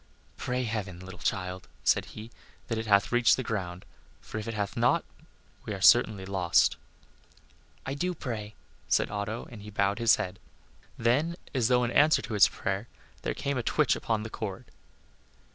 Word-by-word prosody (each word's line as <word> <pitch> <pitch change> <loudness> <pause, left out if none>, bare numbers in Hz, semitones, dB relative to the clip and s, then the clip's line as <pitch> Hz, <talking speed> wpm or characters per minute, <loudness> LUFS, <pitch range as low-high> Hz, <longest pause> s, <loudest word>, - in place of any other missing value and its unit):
"Pray 125 0 -2
heaven, 105 -6 -4
little 95 +1 -10
child," 90 -1 -2 0.2
said - - +3
he, 110 +2 -10 0.4
"that 115 -2 -1
it 110 - -4
hath 100 0 +4
reached 120 -1 +4
the 130 - -2
ground, 90 -6 -4 0.3
for 110 - -6
if 105 - -6
it 115 - -3
hath 100 -1 -2
not - - +2 0.6
we 105 - -4
are - - -7
certainly 105 -1 +5
lost." 90 -3 +3 1.1
"I 135 - -2
do 180 +6 -2
pray," 110 -7 -5 0.3
said - - +2
Otto, 105 +2 -4
and 110 -4 -9
he 105 - -9
bowed 100 +1 0
his 115 -1 +6
head. 90 +1 -5 0.6
Then, 140 +9 +1 0.2
as 125 -5 +2
though 125 0 +3
in 120 - -1
answer 150 +4 +4
to - - -5
his 105 - +7
prayer, 95 +4 -3 0.3
there - - -2
came 140 -2 -2
a - - 0
twitch - - +2
upon 110 -2 -1
the 110 - -7
cord. 110 +1 -5
110 Hz, 180 wpm, -29 LUFS, 100-120 Hz, 1.1 s, his